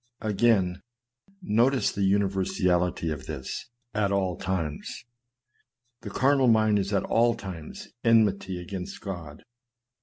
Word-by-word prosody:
Again, 105 -4 +2 0.6
notice 125 +1 +2
the 100 - -4
universality 95 -3 +1
of 70 -3 -6
this 65 -4 -5 0.3
at 105 -2 +1
all 95 -3 0
times. 85 -6 -4 1.0
The - - -7
carnal 135 0 +3
mind 110 -2 +4
is 100 +1 -2
at 100 - +1
all 120 +1 +3
times 85 -6 -8 0.2
enmity 100 -5 +3
against 90 +1 -6
God. 85 -7 -7
95 Hz, 115 wpm, -27 LUFS, 90-110 Hz, 1.0 s, mind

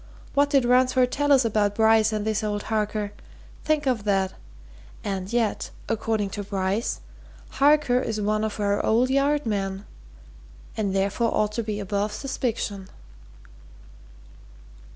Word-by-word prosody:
What 285 0 +3
did 275 -4 +3
Ransford 250 0 +3
tell 290 0 0
us 265 -3 +5
about 205 -2 +1
Bryce 220 0 +4
and 215 -1 -2
this 220 0 0
old 205 -1 -2
Harker 210 -1 -1 0.5
think 305 -1 +1
of 250 -6 0
that! 195 -2 +1 0.7
And 195 -3 -3
yet, 235 -3 0 0.2
according 220 -2 -1
to 205 - -4
Bryce, 195 +2 -2 0.5
Harker 285 -3 +3
is 220 -4 -2
one 215 +1 0
of 215 0 -3
our 205 0 +1
old 245 +4 +2
Yard 285 +1 +2
men! 195 -2 -2 0.9
and 200 -3 -1
therefore 200 +4 +1
ought 210 0 +1
to 230 - -2
be 210 -2 -4
above 205 +1 -2
suspicion." 220 -6 -3
215 Hz, 135 wpm, -25 LUFS, 205-250 Hz, 0.9 s, us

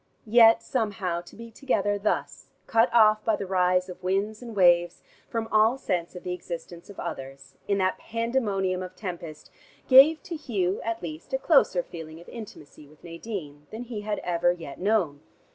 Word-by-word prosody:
Yet, 230 0 +6
somehow, 205 -8 -2
to 175 - -16
be 230 +1 -10
together 205 -5 -1
thus, 210 - -2 0.2
cut 230 +2 +3
off 215 -2 +5
by 220 - +2
the 200 - -5
rise 180 -1 +2
of 180 - -10
winds 195 +4 -1
and 235 -3 -8
waves, 175 -2 +3 0.3
from 225 -1 -3
all 220 +4 +4
sense 175 -9 -3
of 180 - -9
the 180 - -3
existence 170 0 -8
of 200 - -11
others, 135 0 -7
in 200 - +1
that 185 -1 0
pandemonium 215 -6 -1
of 185 0 -8
tempest, 170 -6 -8 0.4
gave 280 +5 +7
to 345 - -6
Hugh 200 - -2
at 230 -2 -4
least 160 +7 -8
a - - +3
closer 265 - +3
feeling 160 -1 -10
of 170 - -15
intimacy 155 -10 -11
with 150 +1 -22
Nadine, 165 -5 -8
than 225 +3 -7
he 230 -3 -6
had 210 0 -3
ever 175 0 +2
yet 165 -6 -8
known. 185 -8 0
195 Hz, 180 wpm, -26 LUFS, 175-225 Hz, 0.4 s, gave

